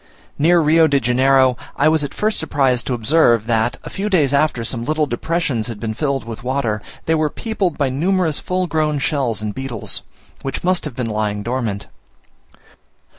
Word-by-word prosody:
Near 170 +3 +4
Rio 160 +1 +5
de 140 -2 +2
Janeiro, 130 +1 +3 0.2
I - - +3
was 155 -1 +3
at 145 - -4
first 215 +1 0
surprised 135 -6 +1
to 125 - 0
observe, 120 -2 +3
that, 115 0 0
a - - -7
few 200 +2 -3
days 150 -8 +2
after 140 -4 +1
some 115 0 -2
little 155 +4 0
depressions 135 -3 -1
had 115 -3 -6
been 110 -1 -3
filled 140 0 -1
with 115 0 -8
water, 125 -5 -1 0.2
they 160 - +1
were 155 -1 +1
peopled 200 -3 -2
by 140 -2 +1
numerous 165 +3 +1
full 185 0 -1
grown 155 -3 0
shells 130 -7 -1
and 105 -1 -3
beetles, 130 -4 -3 0.4
which 135 -1 -4
must 180 -1 +1
have 145 -5 -6
been 125 - -2
lying 105 -1 -2
dormant. 115 -4 -2
135 Hz, 180 wpm, -19 LUFS, 115-160 Hz, 0.4 s, Rio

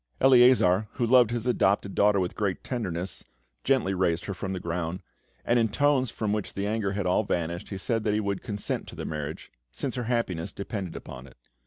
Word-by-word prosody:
Eleazar, 120 -7 +5
who 120 - 0
loved 125 -1 +6
his 120 -1 -2
adopted 100 -5 +1
daughter 100 -1 +4
with 90 -1 -1
great 100 -3 -2
tenderness, 95 -7 -4 0.4
gently 130 -8 +2
raised 90 -2 0
her 100 - -3
from 95 +1 -5
the 95 - -3
ground, 85 +1 -3 0.4
and 120 0 +3
in 115 -1 +2
tones 140 -1 +2
from 105 -1 -2
which 105 -2 -3
the 100 - -2
anger 105 -2 -1
had 100 -1 -2
all 90 +4 +2
vanished, 85 -3 -2
he 95 - -4
said 115 +3 -1
that 105 -1 +1
he - - +1
would 100 -2 -2
consent 105 -4 -3
to - - -10
the - - -5
marriage, 75 0 -5 0.2
since 130 - -4
her 125 -2 -3
happiness 110 -9 -1
depended 100 -3 -5
upon 65 +2 -9
it. 65 - -18
100 Hz, 205 wpm, -27 LUFS, 90-115 Hz, 0.4 s, loved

